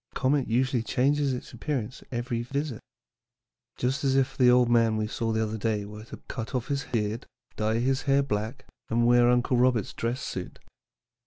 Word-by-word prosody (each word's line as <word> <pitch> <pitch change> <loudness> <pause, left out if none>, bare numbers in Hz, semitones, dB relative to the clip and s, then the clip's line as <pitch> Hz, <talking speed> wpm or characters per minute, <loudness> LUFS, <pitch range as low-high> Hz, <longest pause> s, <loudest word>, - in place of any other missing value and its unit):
A - - -28
comet 135 0 +1
usually 125 +1 +1
changes 140 +4 +1
its 125 - -6
appearance 125 0 -3
at - - -19
every 120 -1 -2
visit. 140 0 -3 1.0
Just 130 +3 -1
as 135 -1 +2
if 135 0 +1
the 125 -2 +5
old 125 0 +5
man 115 -2 +3
we 110 - 0
saw 115 +1 -2
the 110 0 +1
other 110 0 -3
day 105 -1 -1
were 105 +1 -9
to - - -9
cut 115 +1 -5
off 125 -1 -2
his 140 -1 -1
beard, 110 0 -2 0.3
dye 110 +1 0
his 130 +3 +1
hair 140 +1 +4
black, 110 0 -3 0.2
and 115 +1 +2
wear 120 0 +5
Uncle 125 +1 +2
Robert's 125 -4 +2
dress 120 +3 -2
suit. 90 -8 -5
120 Hz, 190 wpm, -27 LUFS, 110-130 Hz, 1.0 s, the